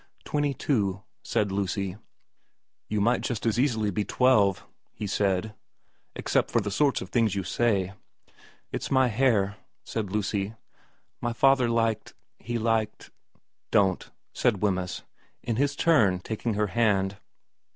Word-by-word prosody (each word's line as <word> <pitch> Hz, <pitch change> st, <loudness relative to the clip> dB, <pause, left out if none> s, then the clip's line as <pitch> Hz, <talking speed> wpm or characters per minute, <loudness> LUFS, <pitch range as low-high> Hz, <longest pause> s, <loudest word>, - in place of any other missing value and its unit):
' -, -, -33 dB
Twenty 145 Hz, -2 st, 0 dB
two,' 100 Hz, -8 st, 0 dB, 0.2 s
said 100 Hz, -2 st, 0 dB
Lucy. 95 Hz, -1 st, -2 dB, 0.4 s
* -, -, -50 dB
You 105 Hz, -, 0 dB
might 120 Hz, +4 st, +2 dB
just 120 Hz, -2 st, -3 dB
as 115 Hz, 0 st, +1 dB
easily 110 Hz, -6 st, +1 dB
be 105 Hz, +3 st, -1 dB
twelve,' 105 Hz, -7 st, +3 dB, 0.3 s
he 105 Hz, -, -6 dB
said, 100 Hz, +1 st, 0 dB, 0.3 s
' -, -, -44 dB
except -, -, 0 dB
for 120 Hz, -, +2 dB
the 105 Hz, -2 st, -3 dB
sorts 140 Hz, +6 st, +2 dB
of -, -, -11 dB
things 115 Hz, -5 st, +2 dB
you 100 Hz, -, -1 dB
say.' 100 Hz, -4 st, 0 dB, 0.4 s
* -, -, -27 dB
It's -, -, -3 dB
my 130 Hz, -2 st, +4 dB
hair,' 105 Hz, -4 st, +2 dB, 0.3 s
said 105 Hz, -4 st, -4 dB
Lucy. 105 Hz, 0 st, -1 dB, 0.3 s
' -, -, -42 dB
My 120 Hz, -1 st, -1 dB
father 130 Hz, 0 st, +4 dB
liked 115 Hz, -2 st, 0 dB, 0.2 s
he 120 Hz, 0 st, -3 dB
liked 115 Hz, -1 st, -1 dB, 0.2 s
' -, -, -39 dB
* -, -, -56 dB
Don't,' 95 Hz, -2 st, 0 dB, 0.2 s
said 110 Hz, -6 st, +1 dB
Wemyss, 90 Hz, -3 st, -1 dB, 0.4 s
in 115 Hz, -3 st, -2 dB
his 140 Hz, +1 st, +1 dB
turn 115 Hz, -, +3 dB
taking 110 Hz, +3 st, -3 dB
her 105 Hz, +1 st, +1 dB
hand. 100 Hz, -4 st, +2 dB
110 Hz, 160 wpm, -27 LUFS, 100-120 Hz, 0.4 s, my